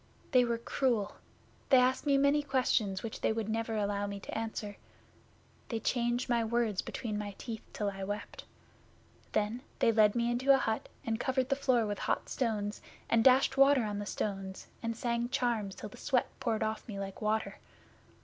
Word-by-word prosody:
They 255 Hz, -2 st, +6 dB
were 235 Hz, -1 st, 0 dB
cruel. 235 Hz, -2 st, 0 dB, 0.5 s
They 265 Hz, -, +7 dB
asked 255 Hz, +3 st, +3 dB
me 280 Hz, -1 st, +5 dB
many 280 Hz, +2 st, +4 dB
questions 250 Hz, -8 st, +1 dB
which 225 Hz, -, -5 dB
they -, -, +2 dB
would 220 Hz, -1 st, -2 dB
never 225 Hz, 0 st, -1 dB
allow 205 Hz, -1 st, 0 dB
me 200 Hz, 0 st, -5 dB
to -, -, -7 dB
answer. 220 Hz, -2 st, -4 dB, 0.9 s
They 230 Hz, -, -1 dB
changed 240 Hz, +2 st, 0 dB
my 235 Hz, -2 st, +2 dB
words 225 Hz, -3 st, 0 dB
between 215 Hz, -4 st, -4 dB
my 205 Hz, -1 st, -5 dB
teeth 225 Hz, -3 st, -6 dB
till 205 Hz, -1 st, -2 dB
I 195 Hz, 0 st, -6 dB
wept. 205 Hz, +2 st, -5 dB, 0.9 s
Then 215 Hz, +4 st, 0 dB, 0.2 s
they 230 Hz, -, +4 dB
led 215 Hz, -1 st, +4 dB
me 235 Hz, 0 st, +1 dB
into 260 Hz, +3 st, +4 dB
a -, -, +4 dB
hut 220 Hz, -4 st, -2 dB, 0.2 s
and 225 Hz, 0 st, -1 dB
covered 260 Hz, 0 st, 0 dB
the 275 Hz, -, +3 dB
floor 255 Hz, -4 st, +2 dB
with 205 Hz, -1 st, -3 dB
hot -, -, -1 dB
stones 215 Hz, -4 st, -1 dB, 0.3 s
and 230 Hz, -1 st, +4 dB
dashed 265 Hz, +1 st, +5 dB
water 275 Hz, -2 st, +6 dB
on 205 Hz, -1 st, -2 dB
the 205 Hz, -, -5 dB
stones, 195 Hz, -3 st, -4 dB, 0.2 s
and 230 Hz, 0 st, -2 dB
sang 235 Hz, 0 st, -1 dB
charms 225 Hz, -6 st, 0 dB
till 210 Hz, -, -7 dB
the -, -, -13 dB
sweat 260 Hz, -4 st, +1 dB
poured 230 Hz, -4 st, 0 dB
off 220 Hz, 0 st, -3 dB
me 205 Hz, -3 st, -5 dB
like 195 Hz, -1 st, -6 dB
water. 215 Hz, +1 st, -1 dB
225 Hz, 190 wpm, -32 LUFS, 210-250 Hz, 0.9 s, They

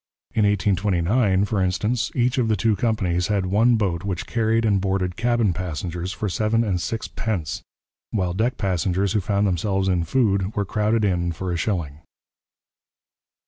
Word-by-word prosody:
In 110 Hz, -, +3 dB
1829, 100 Hz, 0 st, +2 dB
for 105 Hz, -2 st, -1 dB
instance, 105 Hz, +6 st, 0 dB
each 125 Hz, +1 st, +1 dB
of 120 Hz, -, +2 dB
the 110 Hz, -, +2 dB
two 105 Hz, +2 st, +1 dB
companies 95 Hz, -7 st, 0 dB
had 100 Hz, -3 st, 0 dB
one 110 Hz, +6 st, +3 dB
boat 95 Hz, -6 st, -1 dB
which 95 Hz, -4 st, -3 dB
carried 115 Hz, -1 st, +1 dB
and 100 Hz, -3 st, +2 dB
boarded 95 Hz, -2 st, -1 dB
cabin 120 Hz, -5 st, +1 dB
passengers 90 Hz, +1 st, -4 dB
for 105 Hz, -, -3 dB
seven 110 Hz, +4 st, +1 dB
and 95 Hz, -5 st, -1 dB
six 115 Hz, +3 st, -3 dB
pence, 95 Hz, -9 st, -3 dB, 0.5 s
while 90 Hz, -5 st, -1 dB
deck 115 Hz, +6 st, 0 dB
passengers 95 Hz, 0 st, 0 dB
who 105 Hz, -, +1 dB
found 100 Hz, +2 st, +1 dB
themselves 95 Hz, +1 st, 0 dB
in 90 Hz, -3 st, +1 dB
food 100 Hz, -1 st, +1 dB
were 100 Hz, -, 0 dB
crowded 105 Hz, +2 st, +1 dB
in 90 Hz, -3 st, 0 dB
for 90 Hz, +2 st, -4 dB
a -, -, -1 dB
shilling. 85 Hz, -5 st, -2 dB
100 Hz, 165 wpm, -23 LUFS, 90-110 Hz, 0.5 s, In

